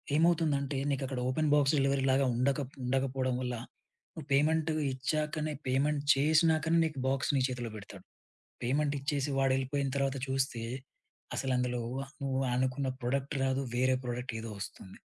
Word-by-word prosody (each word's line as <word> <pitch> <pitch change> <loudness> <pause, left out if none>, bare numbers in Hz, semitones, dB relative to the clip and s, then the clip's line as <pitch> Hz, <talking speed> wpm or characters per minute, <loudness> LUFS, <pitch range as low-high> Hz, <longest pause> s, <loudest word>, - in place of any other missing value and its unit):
ఏమవుతుందంటే 155 -4 +2
నీకక్కడ 135 -1 -2
open 155 +4 +1
box 145 -1 +4
డెలివరీలాగా 135 -1 +3
ఉండక 135 +4 +1 0.2
ఉండకపోవడం 130 0 0
వల్ల 125 -1 -2 0.6
నువ్వు 155 -4 -9
పేమెంటు 155 +3 +3 0.2
ఇచ్చాకనే 150 +3 -1
పేమెంట్ 140 +3 +1
చేసినాకనే 160 +3 +3
నీకు 150 -4 -3
బాక్స్ 135 0 0
నీ - - +3
చేతిలో 125 -2 -4
బెడతాడు. 100 -2 -10 0.6
పేమెంటిచ్చేసి 140 +1 0
వాడెళ్ళిపోయిన 135 +1 +1
తర్వాత 140 0 0
చూస్తే, 130 -3 -1 0.7
అసలందులో 125 -2 0 0.4
నువ్వనుకున్న 130 0 0
ప్రొడక్ట్ 135 +4 -1
రాదు. 135 0 +1
వేరే 130 +1 +3
ప్రోడక్ట్ 125 0 -4
ఏదో 115 0 -6
వస్తుంది. 95 -1 -8
135 Hz, 120 wpm, -31 LUFS, 130-145 Hz, 0.7 s, బాక్స్